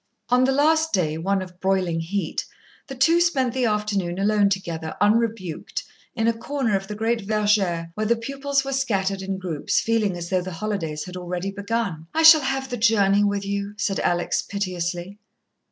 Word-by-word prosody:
On 250 +1 +4
the 265 - +2
last 315 +3 +2
day, 160 -4 0
one 195 +2 0
of 180 -1 -13
broiling 185 -3 0
heat, 170 0 -2 0.4
the 270 - -7
two 330 +7 +4
spent 265 -8 +1
the 255 -1 0
afternoon 210 -5 -1
alone 205 0 +3
together 170 -5 -3
unrebuked, 210 -5 0 0.3
in 225 -1 +1
a 230 - +3
corner 235 -1 -1
of 195 0 -2
the 210 - -5
great 225 +2 0
verger 200 -5 +1
where 215 +3 -2
the 235 - +3
pupils 275 +3 -2
were 275 - -3
scattered 195 -7 0
in 190 0 -3
groups, 175 -6 -1
feeling 215 -5 0
as 170 +1 -6
though 185 -1 +2
the 185 0 -6
holidays 165 -6 -3
had 180 - -9
already 180 +2 -4
begun. 200 -5 -3
"I 320 - +2
shall 320 -1 +9
have 270 0 -2
the 245 - -2
journey 205 -3 +3
with 200 -1 0
you," 200 +1 -3
said 200 -1 -1
Alex, 175 0 0
piteously. 185 -1 -4
200 Hz, 185 wpm, -23 LUFS, 185-230 Hz, 0.4 s, shall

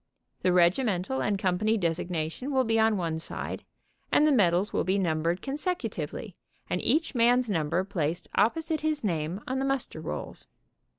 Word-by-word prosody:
The 185 - +3
regimental 185 +5 +2
and 205 -1 +1
company 205 +3 +1
designation 170 - -2
will 265 -1 +3
be 225 -1 +1
on'one 185 -8 +1
side - - -4 0.5
and 300 - +5
the 305 - +4
medals 195 -5 +3
will - - +1
be 190 +2 +1
numbered 170 -1 0
con 275 +1 -3
secutively 360 +3 -3 0.3
and - - -1
each 320 +1 +1
man's 245 -1 +3
number 165 +1 0
placed 175 -3 -2
opposite 320 +6 +1
his 310 -3 -1
name 170 0 -2
on 260 +1 -1
the 270 - 0
muster 270 -2 -1
rolls. - - -6
200 Hz, 160 wpm, -28 LUFS, 175-260 Hz, 0.5 s, and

